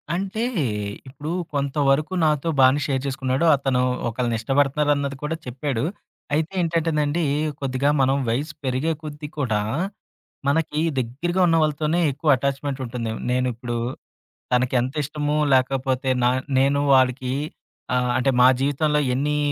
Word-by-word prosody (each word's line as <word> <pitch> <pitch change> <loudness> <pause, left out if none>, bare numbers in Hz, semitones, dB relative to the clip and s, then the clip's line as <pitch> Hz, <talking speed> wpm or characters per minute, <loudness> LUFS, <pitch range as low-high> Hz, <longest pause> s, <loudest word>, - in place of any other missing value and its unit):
అంటే, 195 +4 -2 0.6
ఇప్పుడు 145 +4 -7 0.2
కొంతవరకు 140 +3 +1
నాతో 150 +1 +1
బానే 130 +2 +6
షేర్ 135 -3 -1
చేసుకున్నాడు. 135 +2 0
అతను 135 -2 0 0.3
ఒకళ్ళని 120 0 -1
ఇష్టపడతన్నారన్నది 140 +2 +1
కూడా 155 +2 -1
చెప్పాడు. 125 -1 -3 0.5
అయితే 155 +3 0
ఏంటంటేనండీ, 165 -1 0 0.4
కొద్దిగా 135 +1 0
మనం 135 +1 +3
వయసు 145 +7 -1
పెరిగే 130 +5 0
కొద్దీ 150 0 -7
కూడా, 110 -7 +1 0.9
మనకి 150 +1 +1 0.2
దెగ్గిరగా 145 +10 -1
ఉన్న 165 -1 +3
వాళ్ళతోనే 155 +2 0
ఎక్కువ 145 +3 -2
అటాచ్‌మెంటుంటుండదేమో! 130 -4 -3
నేనుప్పుడు 125 -1 -1 0.8
తనకి 125 +1 +2
ఎంతిష్టమో 150 +3 -2 0.2
లేకపోతే 130 0 +1
నా 125 - +4 0.3
నేను 140 +1 +3
వాడికీ, 130 -1 +2 0.6
ఆహ్, 125 0 +1
అంటే 130 +1 +2
మా 125 - +8
జీవితంలో 150 +2 +1
ఎన్నీ 150 +3 0
140 Hz, 115 wpm, -23 LUFS, 130-150 Hz, 0.9 s, మా